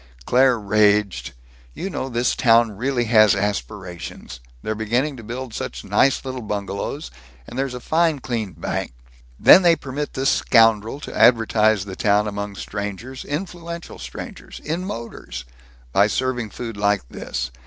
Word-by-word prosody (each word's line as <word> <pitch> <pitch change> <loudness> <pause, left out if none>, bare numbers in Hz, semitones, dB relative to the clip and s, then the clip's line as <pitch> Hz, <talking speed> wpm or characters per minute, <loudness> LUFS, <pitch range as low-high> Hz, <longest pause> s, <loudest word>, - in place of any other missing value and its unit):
Claire 130 0 +4
raged: 105 - +2 0.4
"You 190 - -4
know, 135 -8 -4
this 120 0 0
town 115 -2 +4
really 120 +4 -1
has 110 -2 +5
aspirations. 90 -7 -4 0.2
They're 110 - -1
beginning 120 +7 -1
to 115 - -10
build 120 +2 -6
such - - -5
nice 135 0 +2
little 130 -1 -4
bungalows, 100 - -4 0.3
and - - -10
there's 135 -1 -2
a - - -5
fine 160 +3 +2
clean 115 -7 -3
bank 75 -5 -4 0.4
Then 185 - +9
they 170 -2 +5
permit 145 0 -5
this 135 +1 +2
scoundrel 115 +1 +3
to - - -7
advertise 110 -3 +4
the 95 -2 -7
town 105 +1 +2
among 100 0 -4
strangers, 105 +7 -6
influential 170 +1 -6
strangers, - - -8
in 170 +4 -2
motors, 65 - -7 0.5
by 100 +10 +4
serving 125 -1 -1
food 115 -1 -7
like 100 -8 +1
this! 65 +1 -5
115 Hz, 145 wpm, -22 LUFS, 105-130 Hz, 0.5 s, Then